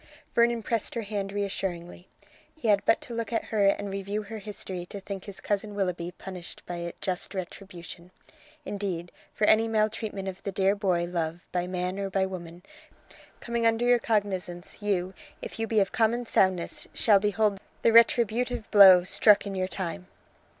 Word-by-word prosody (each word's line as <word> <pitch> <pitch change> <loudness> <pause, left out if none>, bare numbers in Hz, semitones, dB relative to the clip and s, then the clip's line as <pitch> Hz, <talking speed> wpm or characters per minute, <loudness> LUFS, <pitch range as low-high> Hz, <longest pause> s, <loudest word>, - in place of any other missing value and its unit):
Vernon 235 -1 +3
pressed 230 +1 -2
her 230 - -2
hand 200 -1 -3
reassuringly. 190 -3 -4 0.5
He 275 -8 -2
had 200 -1 +4
but 225 - +3
to 240 - -8
look 230 -2 -3
at 230 - 0
her 205 -2 +4
and 200 0 0
review 200 +2 -3
her 220 +1 -7
history 195 -3 -6
to 200 - -7
think 195 -1 -7
his 200 -2 -9
cousin 205 0 -2
Willoughby 180 -3 -2
punished 185 -1 -9
by 170 -1 -5
just 185 +1 -3
retribution. 180 -1 -8 0.6
Indeed, 190 -6 -4 0.2
for 210 - +2
any 220 +1 +5
maltreatment 215 -2 -1
of 190 0 -6
the 200 - -4
dear 195 0 +2
boy 185 -4 +1
Love 170 -1 -3
by 180 0 -1
man 180 +1 -3
or 195 -1 -2
by 190 0 +1
woman, 175 -2 -8 0.8
coming 235 -1 0
under 225 +1 +1
your 245 0 +5
cognizance, 195 -5 -2
you, 190 -3 -1 0.3
if - - -8
you 225 - -1
be 220 -1 +2
of 195 - +1
common 235 +2 +1
soundness, 185 -5 +1
shall 205 -3 +5
behold 210 0 +1 0.2
the 230 - +4
retributive 235 +1 +3
blow 190 -3 +9
struck 205 +3 +5
in 200 - -4
your 185 -1 -1
time. 185 -1 -5
200 Hz, 170 wpm, -27 LUFS, 185-215 Hz, 0.8 s, blow